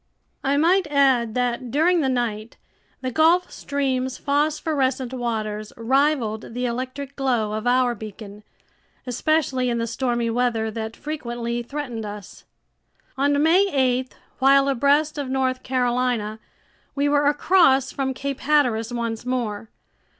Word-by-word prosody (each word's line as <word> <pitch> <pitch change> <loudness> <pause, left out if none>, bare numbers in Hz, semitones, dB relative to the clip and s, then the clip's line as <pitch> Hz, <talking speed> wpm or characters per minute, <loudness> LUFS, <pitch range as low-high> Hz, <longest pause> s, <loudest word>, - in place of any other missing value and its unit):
I 275 +1 +1
might 350 +3 +3
add 265 -6 +2
that 245 0 -1
during 325 +7 +3
the 270 - +1
night, 230 -3 -2 0.4
the 255 -1 -3
Gulf 335 +6 +3
Stream's 260 -2 -2
phosphorescent 285 -3 0
waters 215 -4 -3
rivaled 240 -3 0
the 250 0 -1
electric 255 +3 -4
glow 245 -6 0
of 215 +2 -3
our 250 0 +3
beacon, 210 -1 -10 0.6
especially 260 0 0
in 235 - 0
the 230 - -1
stormy 235 0 -1
weather 230 -2 0
that 220 0 -5
frequently 240 -5 -4
threatened 245 -3 -5
us. 205 -2 -9 0.7
On 285 +2 +2
May 360 +5 +4
8, 255 -1 0 0.2
while 275 +1 +5
abreast 285 +3 +2
of 275 -2 -3
North 260 -1 0
Carolina, 245 -4 -1 0.6
we 285 0 +1
were 290 0 +3
across 290 -3 +3
from 265 -1 -2
Cape 275 0 -4
Hatteras 250 -6 +1
once 230 -2 -3
more. 230 -4 -3
255 Hz, 130 wpm, -23 LUFS, 235-280 Hz, 0.7 s, while